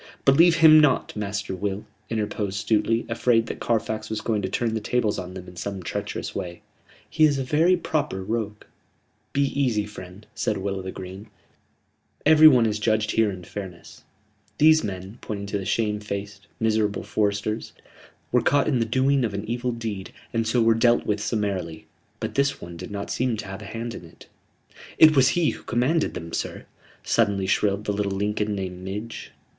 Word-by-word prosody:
"Believe 165 +5 +6
him 155 -1 +8
not, 150 -4 +2
Master 105 -1 -3
Will," 100 +2 -3 0.2
interposed 105 -2 -2
Stuteley, 115 +1 +2
afraid 115 0 +2
that - - -6
Carfax 110 -1 -1
was 110 - -2
going 110 -3 -1
to 95 - -2
turn 115 +3 -1
the 110 - -1
tables 110 0 0
on 90 0 -7
them 95 -1 -8
in 90 - -12
some 95 +1 -5
treacherous - - -4
way. 85 -1 -6 0.4
"He 155 - +1
is 145 -2 +5
a 135 - -1
very 160 +7 +3
proper 150 - -2
rogue." 105 0 -3 0.7
"Be 140 - +2
easy, 120 -7 0
friend," 100 -1 -11
said 105 - -1
Will 100 0 -3
o' - - -4
th' 95 0 -6
Green. 95 +3 -9 1.0
"Every 155 +1 +8
one 125 -6 +6
is 105 -1 0
judged 110 -1 +1
here 110 -1 +3
in 95 -2 -7
fairness. 90 -1 -9 0.5
These 155 +1 +6
men," 95 +2 -6
pointing 100 -2 -5
to 100 0 -2
the 95 - -6
shamefaced, 100 -2 -3
miserable 110 -2 +1
foresters, 105 +1 -1 0.6
"were 125 - +4
caught 140 +4 +2
in 135 -5 +2
the 115 - +1
doing 130 +3 +2
of 105 -4 -1
an 100 +1 -4
evil 120 +2 -1
deed, 110 -5 -5 0.2
and 115 -1 0
so 115 +1 +2
were 115 0 +5
dealt 120 +1 +3
with 105 -1 0
summarily. 95 -8 -2 0.3
But - - -4
this 140 0 +1
one 85 0 -9
did 85 - -8
not 100 -1 -5
seem 125 -2 0
to 105 - -6
have 95 +1 -7
a - - -9
hand 115 +3 -5
in - - -9
it." 80 - -16 0.7
"It 155 -1 +8
was 130 -2 +6
he 170 -3 +3
who - - -10
commanded 135 +8 0
them, 85 -1 -7
sir," - - -4 0.4
suddenly 100 -1 +1
shrilled 100 +1 +1
the 105 - 0
little 100 -1 -1
Lincoln 105 +1 -1
named 95 -2 -5
Midge. 105 +4 -6
105 Hz, 185 wpm, -24 LUFS, 100-120 Hz, 1.0 s, him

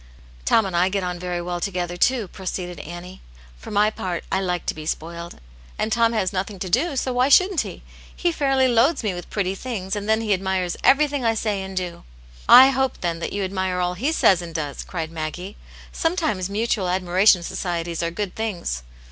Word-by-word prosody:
" - - -23
Tom 225 - +4
and 190 -2 -4
I 180 +2 +3
get 195 0 -1
on 180 -1 -3
very 175 -1 -3
well 175 0 -3
together, 175 -2 -2
too," 230 +3 +2
pro 190 - -12
ceeded 180 -2 -4
Annie. 175 +2 -9 0.2
" - - -23
For - - -10
my 210 +1 +3
part, 180 -5 -4
I 190 - +1
like 180 -2 -2
to - - -1
be 155 0 -8
spoiled. 170 +2 -5 0.4
And 215 - -1
Tom 230 0 +3
has 200 -4 0
nothing 195 +2 -3
to 185 -1 -5
do, 280 - +2
so 260 -1 -1
why 250 +2 +2
shouldn't 365 +3 +5
he? - - -8 0.3
He 350 - +1
fairly 270 -4 +2
loads 250 +5 +3
me 205 -3 0
with 175 -1 -8
pretty 190 -2 -1
things, 195 -3 -4
and 205 +1 -4
then 220 +1 +3
he 215 -2 +1
admires 190 -2 -1
everything 285 -1 +4
I 225 -1 +2
say 210 -2 -1
and 190 0 -7
do." 180 -2 -4 0.3
" - - -21
I 270 - +5
hope, 265 0 -1
then, 170 -2 -1
that - - -4
you 200 0 -2
admire 185 -1 -1
all 180 0 0
he 255 - -1
says 190 - +4
and 165 -2 -8
does!" 145 -3 -3
cried 165 -3 -5
Maggie. 165 +5 -5 0.4
"Sometimes 315 - -1
mutual 210 -2 0
admira 185 +2 +1
tion 180 -5 +7
societies 170 -1 -3
are 170 - 0
good 190 +2 -4
things." 185 - -3
190 Hz, 220 wpm, -23 LUFS, 175-225 Hz, 0.4 s, tion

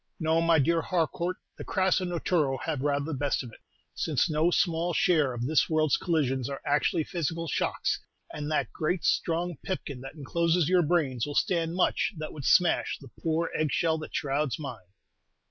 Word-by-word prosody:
"No, 160 0 +2
my 165 -1 +4
dear 165 +3 +2
Harcourt, 175 +1 -1 0.2
the - - -5
crasso 185 0 +1
naturo 165 -5 0
have 155 -5 -2
rather 140 0 0
the 160 - -4
best 140 0 -1
of 120 - -9
it, - - -15 0.3
since 155 +1 0
no 155 +3 +3
small 170 -1 +1
share 155 -7 +3
of 120 -1 -4
this 155 +4 +2
world's 155 -2 +2
collisions 135 -7 0
are 140 - -5
actually 145 +3 +2
physical 165 0 -3
shocks; - - -1 0.3
and 150 0 -4
that 155 - -1
great 165 +2 -1
strong 170 -1 0
pipkin 140 -8 -4
that 135 +3 -9
encloses 165 +2 +1
your 180 0 +4
brains 145 -7 +1
will 145 - -5
stand 170 -2 +1
much 185 +3 +1
that 155 0 -6
would 145 -4 -7
smash 180 -2 +3
the 135 -5 -14
poor 165 +1 0
egg 155 -2 0
shell 160 +2 +1
that 155 - -8
shrouds 140 -2 0
mine." 120 - -7
160 Hz, 180 wpm, -28 LUFS, 140-170 Hz, 0.3 s, my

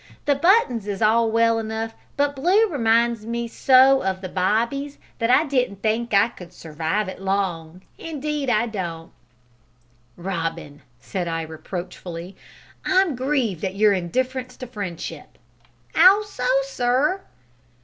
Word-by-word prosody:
The 290 - +4
buttons 280 - +2
is 200 -1 -3
all 225 +1 +3
well 230 0 +3
enough, 225 0 -4 0.2
but 285 0 +1
blue 375 +11 +3
reminds 230 -4 +1
me 235 0 -2
so 265 +3 +5
of 190 -1 -2
the 185 - -6
bobbies 235 +10 -1 0.2
that 230 0 0
I 255 +5 +5
don't 250 -9 -1
think 225 +3 -1
I 200 +2 +4
could 180 -7 -12
surwive 165 +4 -3
it 190 - -8
long 185 -3 -2 0.2
indeed 300 -3 -3
I 230 -1 +2
don't!" 170 -7 -5 1.1
"Robin," 165 -5 -4 0.2
said 180 - -4
I 165 -1 -2
reproachfully, 175 +2 -7 0.5
"I'm 375 -5 +2
grieved 250 - -1
at 190 0 -2
your 210 0 +4
indifference 250 +8 -2
to 255 - -7
friendship." 180 -9 -7 0.6
"'Ow 380 +5 +7
so, 250 -11 -4 0.2
sir?" 270 +7 0
225 Hz, 135 wpm, -23 LUFS, 185-260 Hz, 1.1 s, Ow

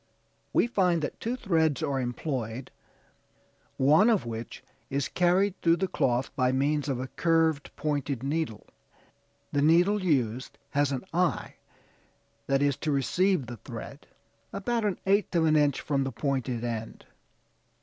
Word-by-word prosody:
We - - +3
find 180 -8 +1
that - - -4
two 235 +3 -2
threads 160 - +1
are 135 -1 0
employed, 125 -1 -4 1.1
one 155 - +5
of 215 - +2
which 115 0 -6 0.3
is 140 0 -1
carried 185 +2 +1
through 165 0 +4
the 190 +3 -1
cloth 125 -6 0
by 130 -1 +2
means 145 +2 0
of 130 -3 -1
a 130 - -3
curved 160 0 +1
pointed 145 -4 -2
needle; 145 -6 -2 0.9
the 145 - +1
needle 175 +7 +4
used 130 -7 0
has 145 -1 +2
the 135 -3 -2
eye 180 +1 0 0.9
that 135 +1 +2
is 140 -2 +1
to 155 - -2
receive 175 +4 +1
the 120 0 -8
thread, - - -9 0.4
about 230 +2 -1
an 200 -3 0
eighth 200 -1 +2
of 165 -1 +3
an 155 -1 +4
inch 145 -3 +3
from 140 -2 0
the 135 - -3
pointed 130 -2 -2
end. 115 -2 -5
145 Hz, 150 wpm, -28 LUFS, 130-175 Hz, 1.1 s, one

